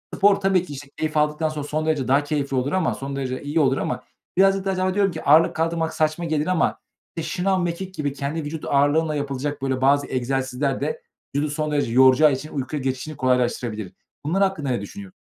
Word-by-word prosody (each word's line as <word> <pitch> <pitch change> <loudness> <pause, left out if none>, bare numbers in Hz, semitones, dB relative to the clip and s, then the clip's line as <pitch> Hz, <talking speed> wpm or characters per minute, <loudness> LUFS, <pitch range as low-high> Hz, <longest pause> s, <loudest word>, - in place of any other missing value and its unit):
spor 200 0 +5
tabii 195 -2 +2
ki, 145 - -8
işte, 140 +1 -8
keyif 155 -1 -2
aldıktan 150 +1 +1
sonra 150 -1 -5
son 155 +1 -2
derece 150 -5 0
daha 140 +2 +3
keyifli 145 -2 -2
olur 130 +3 0
ama, 185 -3 +1
son 135 0 -5
derece 130 -2 -3
iyi 150 +3 0
olur 135 -2 +3
ama - - -3 0.3
birazcık 195 0 +4
da 195 - +1
acaba 185 0 0
diyorum 200 -2 +2
ki 160 - -7
ağırlık 155 +3 +5
kaldırmak 165 0 -1
saçma 155 +2 0
gelir 155 -1 0
ama, 185 -2 +1 0.4
işte, 165 - -4
şınav, 185 0 +1
mekik 180 +2 -4
gibi 145 -2 -2
kendi 145 +3 -3
vücut 150 +1 -5
ağırlığınla 145 +3 +2
yapılacak 145 0 -3
böyle 130 -1 -1
bazı 140 +1 +3
egzersizler 135 +1 -1
de 470 +1 -2 0.3
vücudu 145 +1 0
son 155 0 -2
derece 145 -5 0
yoracağı 130 +4 +6
için 135 +4 -4
uykuya 140 +1 -3
geçişini 130 +4 -3
kolaylaştırabilir. 120 -6 0 0.3
Bunlar 190 +6 +2
hakkında 160 -8 -1
ne 125 - 0
düşünüyor 200 -2 -9
150 Hz, 205 wpm, -23 LUFS, 135-165 Hz, 0.4 s, yoracağı